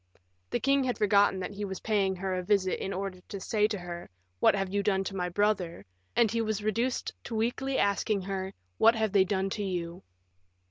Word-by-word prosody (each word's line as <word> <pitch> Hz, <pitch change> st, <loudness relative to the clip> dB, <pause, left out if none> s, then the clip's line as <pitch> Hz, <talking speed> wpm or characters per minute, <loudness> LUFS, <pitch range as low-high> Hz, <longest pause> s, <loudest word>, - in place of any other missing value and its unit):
The -, -, 0 dB
king 275 Hz, 0 st, +3 dB
had 250 Hz, -, -1 dB
forgotten 200 Hz, -2 st, +4 dB
that 185 Hz, -, -4 dB
he 205 Hz, +1 st, -5 dB
was 190 Hz, -2 st, -4 dB
paying 200 Hz, -4 st, +1 dB
her 190 Hz, +1 st, -2 dB
a 185 Hz, -, -1 dB
visit 190 Hz, 0 st, +1 dB
in 195 Hz, -, -3 dB
order 190 Hz, -1 st, -4 dB
to 200 Hz, -, -5 dB
say 210 Hz, +2 st, +2 dB
to 215 Hz, -1 st, -3 dB
her, 175 Hz, -1 st, -7 dB, 0.3 s
"What -, -, +5 dB
have 195 Hz, -1 st, -2 dB
you 200 Hz, -, +2 dB
done 195 Hz, -1 st, +1 dB
to 195 Hz, -, -5 dB
my 180 Hz, -1 st, -1 dB
brother?" 185 Hz, -3 st, 0 dB, 0.3 s
and 235 Hz, -3 st, +4 dB
he 230 Hz, 0 st, +1 dB
was 215 Hz, -2 st, -1 dB
reduced 230 Hz, +4 st, -1 dB
to 230 Hz, -, -4 dB
weakly 245 Hz, +4 st, 0 dB
asking 200 Hz, 0 st, +1 dB
her, 190 Hz, 0 st, -3 dB, 0.3 s
"What 225 Hz, +1 st, +6 dB
have 220 Hz, -2 st, 0 dB
they 195 Hz, -2 st, +5 dB
done 190 Hz, 0 st, -1 dB
to 205 Hz, -, -2 dB
you?" 175 Hz, -2 st, -3 dB
200 Hz, 215 wpm, -29 LUFS, 190-215 Hz, 0.3 s, What